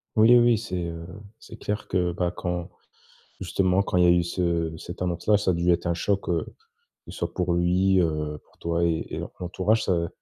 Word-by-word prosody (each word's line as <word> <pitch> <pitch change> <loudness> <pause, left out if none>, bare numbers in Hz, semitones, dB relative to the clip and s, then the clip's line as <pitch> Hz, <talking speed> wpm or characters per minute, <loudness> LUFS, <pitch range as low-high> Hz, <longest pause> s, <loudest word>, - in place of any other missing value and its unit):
Oui, 110 +3 +7
oui, 120 -2 +4
c'est, 110 -5 -5
heu, 85 0 -6 0.3
c'est - - -12
clair 105 0 -4
que 90 -1 0
bah 90 0 -1
quand 90 -1 -4 0.7
justement 95 +1 +1
quand - - -3
il 90 - +5
y - - +5
a - - +6
eu 85 0 +5
ce 85 -2 -1
cette 90 +3 -9
annonce 90 0 -3
là 105 -1 +6
ça 100 -2 +1
a - - 0
dû 85 +1 +2
être 85 +1 0
un 85 - +2
choc, 100 +3 -1
heu, 85 -2 0 0.6
soit - - -4
pour 90 -1 0
lui, 90 +2 +3
heu, 75 -2 -2
pour - - -29
toi 85 0 0
et 80 -1 0
et - - -3 0.2
l'entourage 95 +5 +1
ça 85 -2 0
90 Hz, 210 wpm, -25 LUFS, 85-95 Hz, 0.7 s, Oui